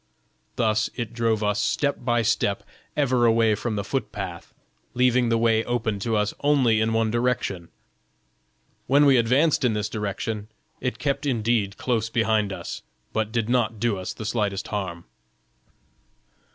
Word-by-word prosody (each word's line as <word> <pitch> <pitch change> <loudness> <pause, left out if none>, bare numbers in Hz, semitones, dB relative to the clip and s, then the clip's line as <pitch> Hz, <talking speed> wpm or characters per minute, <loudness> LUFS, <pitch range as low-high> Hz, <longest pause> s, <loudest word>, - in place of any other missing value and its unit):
Thus 110 -2 +1
it 120 -2 -4
drove 115 -2 0
us 105 0 +1
step 145 -1 0
by 120 -1 +1
step 100 -2 0 0.3
ever 130 -4 +3
away 115 -1 +4
from 110 +2 -2
the 100 - -2
foot 135 +7 -3
path, 90 -4 -6 0.4
leaving 125 -1 +3
the 115 - +3
way 115 -1 +3
open 115 -4 -1
to 110 +3 -1
us 105 0 0
only 130 -7 +3
in 110 0 +1
one 115 -1 +1
direction. 120 -7 -1 1.2
When 140 +3 +5
we 135 -2 +6
advanced 135 +7 +3
in 120 -3 +3
this 105 -1 -2
direction, 105 0 -3 0.3
it 125 -1 -2
kept 140 0 -1
indeed 115 -5 0
close 115 -3 -1
behind 110 -3 +1
us, 95 - -6 0.3
but 110 -1 -1
did 115 -2 -1
not 115 -3 +1
do 105 -3 0
us 95 - -4
the 110 - -7
slightest 105 -3 -1
harm." 95 -5 -4
115 Hz, 155 wpm, -24 LUFS, 105-120 Hz, 1.2 s, we